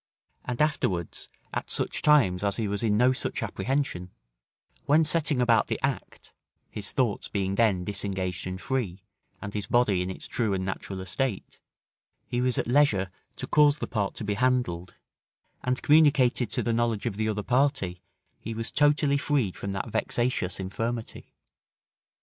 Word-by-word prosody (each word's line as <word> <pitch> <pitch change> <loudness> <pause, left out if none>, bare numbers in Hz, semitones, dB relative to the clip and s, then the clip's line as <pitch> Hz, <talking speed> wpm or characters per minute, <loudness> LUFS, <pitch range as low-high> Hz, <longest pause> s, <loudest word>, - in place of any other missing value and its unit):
And 125 +3 0
afterwards, 90 - -1 0.3
at - - -3
such - - -1
times 120 -12 +4
as 100 -1 0
he 110 -3 -1
was 100 0 -2
in 105 -3 +2
no 125 +3 +4
such - - -3
apprehension, 130 -10 -2 0.8
when 155 +3 +5
setting 155 -3 +2
about 120 -2 +3
the - - -2
act - - -4 0.4
(his 105 -2 -2
thoughts 120 -6 0
being 95 -1 -1
then 100 -4 +2
disengaged 95 -2 -3
and 95 0 -5
free, 105 -7 -3 0.4
and 100 0 -6
his 105 -2 -3
body 105 -7 +3
in 90 - -2
its 95 - -5
true 110 -5 -1
and 95 0 -2
natural 95 0 -5
estate) 110 +3 -3 0.7
he 120 - -2
was 125 -1 +1
at - - 0
leisure 120 -8 +3 0.2
to - - -4
cause 150 -1 +4
the - - -3
part 105 -4 -2
to - - -5
be 105 0 -1
handled 105 -7 0 0.7
and 125 +1 -1
communicated 145 -5 +4
to - - 0
the 120 - 0
knowledge 115 -2 0
of 115 -5 -1
the 110 +1 -1
other 105 -1 -2
party, 125 -9 +1 0.4
he 115 +1 -6
was 115 +1 -4
totally 145 -1 +3
freed 135 -10 0
from 100 - -5
that 95 +3 -4
vexatious 120 -8 -1
infirmity. 115 +5 -4
115 Hz, 165 wpm, -27 LUFS, 95-130 Hz, 0.8 s, when